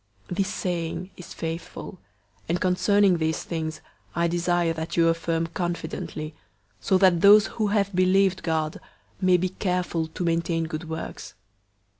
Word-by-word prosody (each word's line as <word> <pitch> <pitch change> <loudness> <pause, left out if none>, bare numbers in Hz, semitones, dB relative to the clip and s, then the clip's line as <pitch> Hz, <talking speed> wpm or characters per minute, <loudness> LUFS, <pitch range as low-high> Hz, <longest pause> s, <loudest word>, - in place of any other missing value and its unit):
003:008 180 - -3
This 195 0 +1
saying 180 0 -3
is 180 - -10
faithful, 165 +3 -6 0.5
and 175 +1 +1
concerning 190 +1 +3
these 160 0 -1
things 160 -2 -4 0.3
I 170 +1 +2
desire 175 0 +1
that 160 +1 -5
you 165 0 +5
affirm 165 0 0
confidently, 165 -2 -4 0.5
so 185 - +2
that 185 -3 +4
those 205 +2 +8
who 215 -1 -2
have 200 -1 +1
believed 185 +1 +3
God 160 -1 -1 0.4
may 185 -1 +5
be 185 +1 -1
careful 180 -3 -1
to 160 +3 -5
maintain 165 0 0
good 160 0 -5
works. 160 0 -6
175 Hz, 145 wpm, -25 LUFS, 165-185 Hz, 0.5 s, those